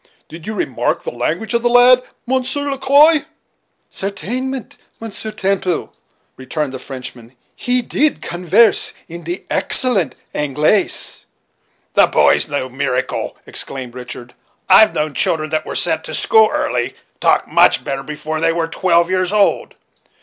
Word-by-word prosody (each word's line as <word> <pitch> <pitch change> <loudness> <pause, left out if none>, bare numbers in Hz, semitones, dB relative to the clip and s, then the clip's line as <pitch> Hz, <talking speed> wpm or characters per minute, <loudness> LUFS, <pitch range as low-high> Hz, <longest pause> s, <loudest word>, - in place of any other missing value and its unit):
Did 165 +2 -11
you 220 - -4
remark - - -2
the - - -4
language 220 - -3
of 235 - +1
the 240 - +1
lad. 245 +1 +6 0.2
Monsieur 265 +3 -1
Le 275 - -4
Quoi?" 300 +3 +5 0.7
"Certainement, 245 +7 -4 0.2
Monsieur 220 -1 -6
Temple," 190 -4 -2 0.4
returned 135 +2 -4
the 130 - -6
French 130 -1 -8
man, 120 +1 -17 0.2
"he 245 0 0
deed 295 +5 0
convairse 180 +6 +2
in 170 0 -9
de 175 +3 -5
excellent 195 - +2 0.2
Anglaise." 150 +7 0 0.7
"The - - +5
boy - - +4
is - - -2
no 140 -3 -2
miracle," 130 -1 -3
exclaimed 130 -3 -5
Richard; 125 -1 -9 0.3
"I've 215 +3 +6
known 150 -1 -1
children 155 +3 0
that 155 0 -2
were - - -5
sent 160 -2 +1
to 155 - -5
school 220 +5 +4
early, 300 0 -2 0.2
talk - - +2
much - - +3
better 135 0 -3
before 150 +2 -5
they 165 0 +3
were 165 0 -1
twelve 170 0 +2
years 185 0 0
old. 210 -1 +1
180 Hz, 150 wpm, -17 LUFS, 150-240 Hz, 0.7 s, lad